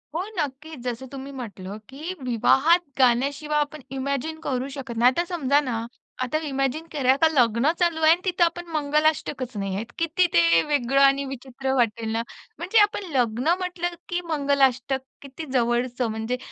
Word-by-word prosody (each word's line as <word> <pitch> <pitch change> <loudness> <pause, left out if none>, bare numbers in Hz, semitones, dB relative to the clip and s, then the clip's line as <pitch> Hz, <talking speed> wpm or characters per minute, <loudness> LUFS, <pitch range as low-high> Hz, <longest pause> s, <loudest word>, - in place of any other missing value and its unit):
हो, 350 - 0
नक्कीच. 295 0 -4
जसं 250 +1 -4
तुम्ही 275 0 -7
म्हटलं, 205 -6 -7
की 305 +7 -6
विवाहात 265 +8 +4 0.2
गाण्याशिवाय 280 +5 +2
आपण 295 0 -3
इमॅजिन 280 +4 -3
करू 265 -4 -2
शकत 265 -4 -7
नाही. 245 +2 +5
आता 340 +6 0
समजा 290 -6 +1
ना, 250 -5 -2 0.5
आता 255 +5 -1
इमॅजिन 275 +3 -1
करा, 265 -3 +3
का 325 - +7
लग्न 240 +1 +3
चालू 340 -2 +1
आहे 315 0 +6
आणि 345 - +3
तिथं 360 -1 +2
आपण 345 +1 0
मंगलाष्टकच 295 -4 0
नाहीयेत. 200 +4 -3
किती 335 +2 +2
ते 170 0 +5
वेगळं 275 -2 +2
आणि 275 0 +5
विचित्र 265 0 -5
वाटेल 230 -2 0
ना? 225 - 0 0.4
म्हणजे 375 +6 +2
आपण 410 -1 +1
लग्न 245 +4 +2
म्हटलं, 350 -1 -3
की 350 0 -1
मंगलाष्टक 275 -3 +2 0.2
किती 280 +3 -8
जवळचं 245 0 +1
म्हणजे, 220 +3 -3
275 Hz, 160 wpm, -24 LUFS, 245-315 Hz, 0.5 s, का